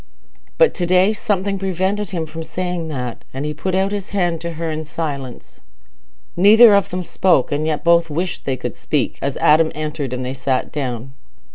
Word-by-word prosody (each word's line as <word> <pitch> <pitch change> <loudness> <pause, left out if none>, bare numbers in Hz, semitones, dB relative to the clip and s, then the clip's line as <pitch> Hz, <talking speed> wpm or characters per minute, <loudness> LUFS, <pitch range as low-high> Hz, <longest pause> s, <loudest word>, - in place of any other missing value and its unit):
But - - +5
to 175 -2 -2
day 185 +4 +4
something 200 -2 -1
prevented 190 +2 -1
him 170 -4 -3
from 160 +1 -7
saying 175 0 -3
that, 125 -6 -5
and 135 +2 -3
he 150 - -2
put 185 +5 -3
out 190 +1 +1
his 205 -1 -4
hand 175 -5 -1
to 170 0 -4
her 165 0 -3
in 155 0 -4
silence. 140 -5 -6 0.8
Neither 215 +5 +7
of 200 -1 +3
them 180 0 -3
spoke, 170 -6 +2
and 150 +2 -1
yet 155 -1 -1
both 170 -1 +4
wished 170 +4 -3
they 135 -2 -1
could 125 -1 -5
speak, 150 -4 -2
as 140 -1 -2
Adam 155 +1 +4
entered, 150 -3 -4
and 125 0 -3
they 130 - -3
sat 135 -1 -1
down. 130 -3 -4
165 Hz, 190 wpm, -19 LUFS, 145-185 Hz, 0.8 s, Neither